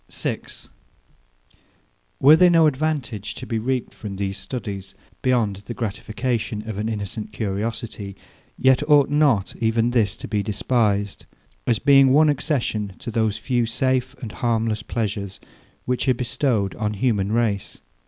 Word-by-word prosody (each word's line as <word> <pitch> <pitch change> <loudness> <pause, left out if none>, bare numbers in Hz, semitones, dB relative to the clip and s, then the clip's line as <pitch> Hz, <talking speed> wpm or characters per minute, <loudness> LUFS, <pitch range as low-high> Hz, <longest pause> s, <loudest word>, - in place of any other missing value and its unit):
6. - - -4 1.5
Were 145 +4 +8
there 180 +2 +6
no 165 -2 +5
advantage 135 -8 -1
to 130 - -7
be 115 -3 -2
reaped 125 +2 -2
from 100 -3 -7
these 100 0 -2
studies, 100 -4 -6 0.3
beyond 115 -6 +1
the 105 +4 -8
gratification 110 0 -3
of 105 -2 -4
an 110 +1 -1
innocent 105 0 -4
curiosity, 105 -1 -4 0.4
yet 130 0 +4
ought 145 -2 +5
not 145 -10 +2
even 115 +1 +1
this 110 -6 +1
to - - -8
be 105 0 0
despised; 105 -1 0 0.4
as 120 - +3
being 135 -2 +6
one 155 +3 +5
accession 115 - -1
to 120 - -6
those 110 -1 0
few 120 0 0
safe 130 +3 0
and 110 - -5
harmless 115 -2 0
pleasures, 100 -3 -3 0.5
which 125 +1 0
are 130 - +4
bestowed 120 -5 0
on 105 -1 -1
human 105 -3 0
race. 110 -3 -1
115 Hz, 145 wpm, -23 LUFS, 105-130 Hz, 1.5 s, Were